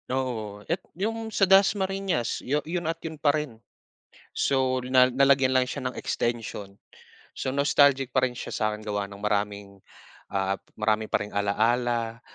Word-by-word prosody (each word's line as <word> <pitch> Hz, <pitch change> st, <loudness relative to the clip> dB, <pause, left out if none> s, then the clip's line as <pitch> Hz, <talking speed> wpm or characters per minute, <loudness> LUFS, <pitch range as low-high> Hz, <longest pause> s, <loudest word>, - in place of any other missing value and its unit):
Oo. 110 Hz, -6 st, -3 dB
Et 175 Hz, +3 st, -2 dB, 0.2 s
'yong 225 Hz, +3 st, -2 dB
sa 205 Hz, -2 st, +3 dB
Das 195 Hz, +2 st, +5 dB
Marinas, 190 Hz, -, -1 dB
'yon 155 Hz, +5 st, -2 dB
at 165 Hz, -, -2 dB
'yon 160 Hz, -2 st, -7 dB
pa 145 Hz, -1 st, +3 dB
rin. 130 Hz, -7 st, -6 dB, 0.7 s
So, 130 Hz, -1 st, +1 dB
na 125 Hz, 0 st, +5 dB
nalagyan 135 Hz, 0 st, +3 dB
lang 130 Hz, -1 st, +3 dB
siya 125 Hz, -, -4 dB
ng 125 Hz, -, -3 dB
extension. 115 Hz, -4 st, -3 dB, 0.6 s
So, 130 Hz, -, -3 dB
nostalgic 140 Hz, -2 st, +3 dB
pa 130 Hz, -, +3 dB
rin 125 Hz, -, -6 dB
siya -, -, -7 dB
sa'kin 110 Hz, -1 st, -1 dB
gawa 105 Hz, -1 st, -2 dB
ng 100 Hz, 0 st, -12 dB
maraming, 100 Hz, -1 st, -2 dB, 0.5 s
ah, 95 Hz, 0 st, -1 dB, 0.2 s
marami 110 Hz, 0 st, 0 dB
pa -, -, +1 dB
ring 105 Hz, -, -13 dB
alala. 115 Hz, +3 st, 0 dB
125 Hz, 155 wpm, -26 LUFS, 105-145 Hz, 0.7 s, Das